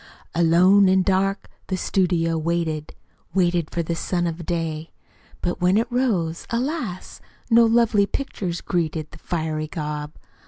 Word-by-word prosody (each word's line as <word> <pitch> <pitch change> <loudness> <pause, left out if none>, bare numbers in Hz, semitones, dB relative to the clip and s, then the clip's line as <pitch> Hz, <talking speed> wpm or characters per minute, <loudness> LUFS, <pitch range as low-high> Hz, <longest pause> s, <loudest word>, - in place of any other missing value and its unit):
"Alone 180 +4 +5
an' 190 0 +4
dark 195 +1 0 0.2
The 190 - -1
studio 170 -3 +1
Waited: 160 -1 -2 0.4
Waited 175 -3 +2
for 170 - -2
the 170 - -2
sun 175 +1 -1
of 170 -1 -4
day. 165 -2 -2 0.5
But 175 +1 -2
when 180 +3 +4
it 230 +2 0
rose, 195 -11 0
Alas! 240 - -3 0.3
No 230 0 +7
lovely 225 -3 +3
pictures 185 -11 -4
greeted 160 -3 -2
The 155 - -13
fiery 155 -2 -2
gob. 150 -1 -5
175 Hz, 135 wpm, -23 LUFS, 165-195 Hz, 0.5 s, No